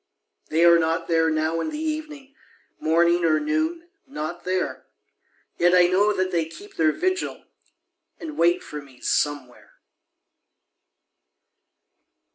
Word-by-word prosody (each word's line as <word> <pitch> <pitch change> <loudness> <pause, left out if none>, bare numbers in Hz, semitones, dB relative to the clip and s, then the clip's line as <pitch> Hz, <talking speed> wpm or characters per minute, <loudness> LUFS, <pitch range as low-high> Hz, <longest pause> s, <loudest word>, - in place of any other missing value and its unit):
They 165 +2 +3
are 170 0 +7
not 165 +1 -1
there 165 -1 +2
now 160 +1 0
in - - -3
the 305 - -5
evening 305 -3 -5 0.5
Morning 170 +2 +2
or 160 -2 +3
noon 315 +2 -2 0.2
not 175 - -6
there; 185 0 -2 0.7
Yet 175 +1 +4
I 180 -1 +6
know 195 +4 +3
that 185 -2 -1
they 170 -2 0
keep 165 +6 -13
their 155 -1 +3
vigil, 370 - -2 0.8
And 315 -2 -7
wait 170 +1 +2
for 150 -1 -7
me 135 -3 -18
Somewhere. 145 -4 -2
175 Hz, 125 wpm, -24 LUFS, -, 0.8 s, are